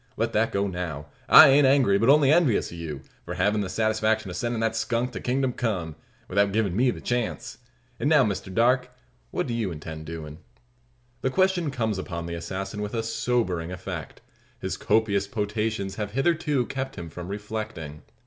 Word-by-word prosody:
Let - - -1
that 115 +2 +2
go 100 0 0
now. 85 -6 -5 0.2
I - - +10
ain't 140 0 +6
angry, 130 -8 +4
but 115 - +3
only 145 -1 +6
envious 155 -9 +3
o' - - -8
you, 80 -5 -6 0.2
for - - -6
havin' 105 0 +1
the 95 - -3
satisfaction 110 -1 0
of - - -6
sendin' 120 +4 -2
the 115 0 +2
skunk 115 +2 -1
to - - -6
kingdom 130 0 0
come, 90 -11 -2 0.3
without 100 +1 +2
givin' 100 -3 0
me 125 +4 +3
the - - -3
chance. 120 -1 -3 0.4
An' - - 0
now, 150 -3 +5
Mister 100 -4 -2
Darke, 125 +5 +2 0.4
what - - -2
do 120 - -3
you 115 -4 -1
intend 80 0 -8
doin'?" 80 -1 -7 0.8
The 130 - +1
question 185 0 +2
comes 110 -7 -1
upon 85 -3 -5
the 85 - -5
assassin 95 +4 -5
with 105 +2 -4
a 115 - -1
sobering 110 -7 -1
effect. 90 - -7 0.4
His - - -3
copious 105 -2 +1
potations 105 -1 -2
have 105 -1 -4
hitherto 150 -2 +1
kept 135 +1 -4
him 85 -4 -7
from 85 +1 -7
reflecting. 100 -7 -6
110 Hz, 185 wpm, -26 LUFS, 90-125 Hz, 0.8 s, I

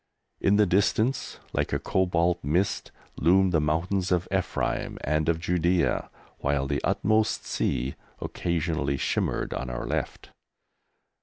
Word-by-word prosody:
In 100 - +3
the 105 0 +5
distance, 105 +7 +1 0.2
like - - 0
a - - +2
cobalt 90 -2 +1
mist, 90 +8 0 0.3
loomed 95 +3 +4
the 80 -3 +3
mountains 90 +5 0
of 90 0 +1
Ephraim 95 -1 -1
and 75 +2 +1
of 85 - +2
Judæa, 85 0 +1 0.3
while 70 -1 0
the 70 +1 -2
"utmost 110 +1 +1
sea" 65 +3 -1 0.3
occasionally 80 -5 -1
shimmered - - -1
on 65 - -4
our - - -4
left. - - -3
85 Hz, 130 wpm, -27 LUFS, 75-95 Hz, 0.3 s, the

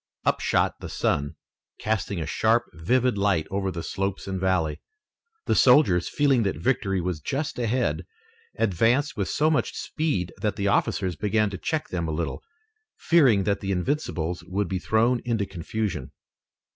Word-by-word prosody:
Up - - +2
shot - - +1
the - - -7
sun, 70 +2 -1 0.4
casting 105 -3 -2
a 80 - -2
sharp, 110 +8 +2
vivid 120 +8 +1
light 100 -6 +2
over 95 0 -1
the 85 -3 -5
slopes 95 0 -3
and 95 -1 -3
valley. 90 -5 0 0.6
The - - +2
soldiers, 90 - +5
feeling 140 -4 +2
that 100 -3 0
victory 100 -7 0
was 90 -2 -2
just 140 - -3
ahead, 120 +1 0 0.5
advanced 115 - +2
with 100 -3 -2
so 155 +2 +2
much 150 - 0
speed 120 - -2
that 105 -2 -1
the 100 -1 -1
officers 95 -2 +1
began 105 +4 +1
to 95 - -5
check 160 -1 -2
them 85 -2 -2
a - - -2
little, 85 0 -3 0.6
fearing 130 - +4
that 100 0 0
the 100 -1 -3
Invincibles 90 - -2
would 100 +1 -1
be 95 +1 -2
thrown 115 +5 +2
into 115 -4 0
confusion. 95 -3 -4
100 Hz, 160 wpm, -25 LUFS, 90-120 Hz, 0.6 s, soldiers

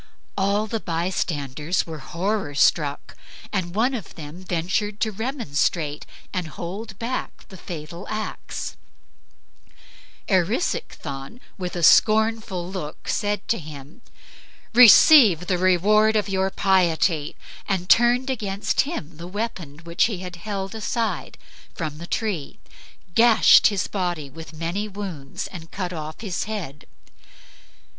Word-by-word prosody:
All 200 +2 +1
the 220 +1 -3
bystanders 165 -3 -2
were 160 -2 -7
horror 180 +1 -2
struck, 145 -1 +1 0.4
and 185 -3 -2
one 245 +5 +2
of 235 -6 -6
them 160 +3 -9
ventured 185 +4 -1
to 220 - +1
remonstrate 175 - -2 0.3
and 180 -3 -2
hold 190 +7 -7
back 240 +3 -5
the 190 - -11
fatal 170 0 -8
axe. 215 0 -5 1.5
Erisichthon, 180 - -1 0.2
with 180 -1 -4
a 175 - -3
scornful 215 -1 +4
look, 180 -5 -7
said 205 -1 -1
to 230 - +1
him, 150 - -11 0.7
"Receive 235 - +8
the 180 -1 0
reward 210 +4 +4
of 210 -2 +1
your 190 -1 0
piety;" 175 -5 +1 0.3
and 185 -2 -1
turned 245 +5 +4
against 205 -5 0
him 175 - -5
the 170 +1 -8
weapon 180 -7 -5
which 170 +1 +2
he 220 -5 -2
had 180 0 -8
held 195 +1 -4
aside 220 -4 -2 0.4
from 155 -2 -4
the 170 - -8
tree, 195 - -3 0.6
gashed 230 +1 +7
his 205 -2 0
body 175 -7 -3
with 160 +3 -10
many 170 +6 -3
wounds, 185 -9 -6
and 165 -3 -9
cut 180 -2 -4
off 155 +1 -6
his 195 -6 -3
head. 180 -10 -6
185 Hz, 125 wpm, -23 LUFS, 165-215 Hz, 1.5 s, Receive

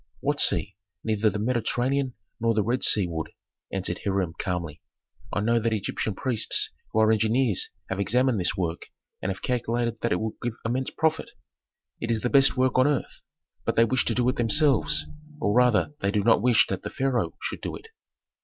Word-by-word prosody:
"What - - 0
sea? 100 -1 +3 0.3
Neither 110 -1 +1
the 105 - -4
Mediterranean 125 +3 0 0.2
nor 115 -1 +1
the 105 - +2
Red 120 +5 -1
Sea 105 -3 +5
would," 80 -2 -4 0.4
answered 90 -2 -3
Hiram 95 -4 -1
calmly. 85 -4 -3 0.5
"I 105 - -1
know 115 +2 +2
that 115 0 0
Egyptian 105 0 -2
priests 125 -1 +1 0.2
who 110 - +1
are 110 0 +4
engineers 110 0 +1 0.2
have 95 - -4
examined 120 +3 +2
this 90 +2 0
work 85 -2 -3 0.3
and - - -2
have 95 - -8
calculated 120 -1 -1
that 115 - -1
it - - +1
would 110 0 -3
give 120 -1 -2
immense 125 +3 -1
profit, 160 0 -1 0.7
it 115 - -4
is 115 -2 0
the 125 - -1
best 135 -1 +5
work 130 0 +2
on 130 - +5
earth. 145 -3 -2 0.4
But - - -1
they 115 - +5
wish 130 +3 +1
to 115 - 0
do 125 -1 +1
it 130 - -2
themselves, 120 - +2 0.3
or 105 -7 +1
rather 125 +3 +3
they 100 - +1
do 105 0 0
not 115 +1 +4
wish 120 -2 +4
that 95 - -3
the - - -5
pharaoh 130 -2 -1
should - - -5
do - - -4
it." 450 - -12
115 Hz, 195 wpm, -26 LUFS, 100-125 Hz, 0.7 s, Sea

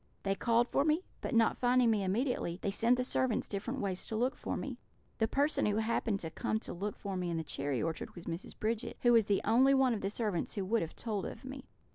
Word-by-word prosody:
They 195 - +1
called 235 +4 +2
for 275 - +2
me, 310 +4 +2 0.2
but 260 - -2
not 225 -1 +4
finding 245 -1 +4
me 210 -2 +1
immediately, 195 -3 0
they 200 - 0
sent 235 +5 +3
the 250 - +1
servants 255 -2 0
different 235 +6 -3
ways 190 -2 -2
to 220 - -3
look 250 +5 +1
for - - -3
me. - - -5 0.4
The 220 - +3
person 285 +2 +1
who 205 - +1
happened 220 -2 0
to 160 - -5
come 215 - -1
to - - -4
look 200 +4 -3
for 200 -2 -4
me 180 -1 -2
in 170 - -1
the 160 - -2
cherry 140 -3 -2
orchard 165 0 -4
was 175 - -9
Mrs. 165 +3 -6
Bridget, 225 +2 -2
who 240 -1 +6
was 225 -3 +5
the 200 - +2
only 260 +5 +5
one 265 -2 +4
of 215 - -3
the 195 - -1
servants 210 -5 -2
who 200 -3 -2
would 225 +4 +1
have 160 - -5
told 210 -5 -3
of - - -9
me. 265 0 -7
220 Hz, 250 wpm, -33 LUFS, 195-245 Hz, 0.4 s, who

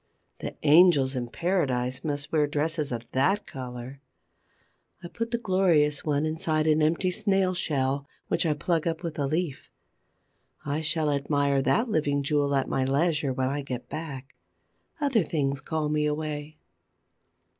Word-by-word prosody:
The - - -5
angels 150 -4 +5
in 125 -1 -2
paradise 130 -6 -1
must 145 -1 -3
wear 150 -2 +2
dresses 150 0 -1
of 120 -1 -4
that 170 +11 +1
color. 130 -3 -8 1.0
I - - -5
put 230 +4 -4
the 235 - 0
glorious 175 -9 +2
one 150 0 0
inside 155 0 0
an 155 0 +3
empty 165 +4 +2
snail 195 -2 +1
shell, 140 -5 -1 0.2
which - - +1
I 155 -3 +1
plug 165 +2 0
up 165 +1 -2
with 165 -3 -4
a 140 - +1
leaf. 155 -1 -2 1.0
I 145 +2 -1
shall 155 -1 0
admire 140 -1 +1
that 225 - +2
living 145 -8 0
jewel 140 0 +1
at 135 - +1
my 135 - 0
leisure, 145 +1 +1
when 130 0 -1
I 145 +1 -2
get 125 -3 -6
back. 140 -4 -6 0.7
Other 275 -7 +2
things 140 -4 -1
call 155 -2 -2
me 150 0 +1
away. 150 0 -4
150 Hz, 155 wpm, -27 LUFS, 140-165 Hz, 1.0 s, angels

